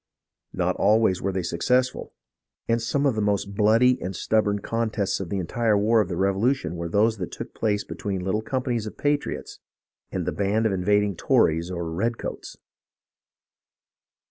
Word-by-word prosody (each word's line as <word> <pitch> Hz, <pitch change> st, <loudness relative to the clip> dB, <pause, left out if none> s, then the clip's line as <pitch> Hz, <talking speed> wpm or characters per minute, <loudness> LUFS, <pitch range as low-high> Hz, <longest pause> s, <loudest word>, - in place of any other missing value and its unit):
Not -, -, 0 dB
always 105 Hz, -3 st, +3 dB
were 100 Hz, -, -1 dB
they 95 Hz, -1 st, -2 dB
success 125 Hz, +10 st, +2 dB
ful, -, -, -9 dB, 0.6 s
and 115 Hz, 0 st, +1 dB
some 140 Hz, +5 st, 0 dB
of 135 Hz, -, +3 dB
the 110 Hz, -, -2 dB
most 100 Hz, -1 st, 0 dB
bloody 115 Hz, +5 st, +4 dB
and 95 Hz, +1 st, -4 dB
stubborn 105 Hz, +2 st, +1 dB
contests 110 Hz, -2 st, -1 dB
of 95 Hz, -3 st, -5 dB
the 100 Hz, -, -2 dB
entire 105 Hz, +4 st, +1 dB
war 110 Hz, +2 st, +3 dB
of 100 Hz, -, -3 dB
the 85 Hz, -, -3 dB
Revolution 100 Hz, -, +1 dB
were 85 Hz, 0 st, -4 dB
those 110 Hz, +5 st, +2 dB
that 90 Hz, -3 st, -5 dB
took -, -, -7 dB
place 105 Hz, -2 st, 0 dB
between 95 Hz, -5 st, -4 dB
little 95 Hz, +3 st, 0 dB
companies 120 Hz, -2 st, -2 dB
of -, -, -9 dB
patriots 145 Hz, 0 st, -2 dB, 0.5 s
and -, -, -2 dB
the -, -, -1 dB
band 105 Hz, +3 st, 0 dB
of 110 Hz, -, +2 dB
invad 100 Hz, +2 st, +2 dB
ing 100 Hz, -2 st, -2 dB
Tories 80 Hz, +1 st, +2 dB
or 85 Hz, -2 st, -4 dB
redcoats. 115 Hz, +8 st, -3 dB
105 Hz, 170 wpm, -25 LUFS, 95-115 Hz, 0.6 s, bloody